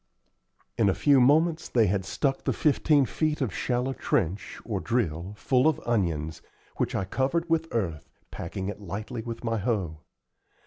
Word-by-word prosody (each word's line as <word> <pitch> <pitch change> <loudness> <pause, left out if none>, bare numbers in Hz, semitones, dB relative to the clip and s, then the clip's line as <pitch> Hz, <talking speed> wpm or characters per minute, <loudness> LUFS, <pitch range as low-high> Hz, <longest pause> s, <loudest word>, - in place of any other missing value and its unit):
In 105 -3 +5
a 95 - +1
few 140 -3 +5
moments 155 +5 +3
they 115 -3 +4
had 95 -1 0
stuck 135 +6 -1
the - - +1
fifteen 150 -1 +3
feet 155 +4 -1
of 125 -9 -1
shallow 125 +2 -1
trench, 90 -7 -1
or 105 -4 -2
drill, 95 -5 -1
full 130 +5 +3
of 160 - +2
onions, 80 -8 -1 0.4
which - - -1
I 95 - 0
covered 140 - 0
with 165 -1 +1
earth, 85 -10 -2 0.2
packing 95 +3 -5
it 105 +1 -5
lightly 105 +5 -5
with 115 +1 -6
my 115 -1 0
hoe. 95 -8 -1
115 Hz, 165 wpm, -27 LUFS, 95-135 Hz, 0.4 s, In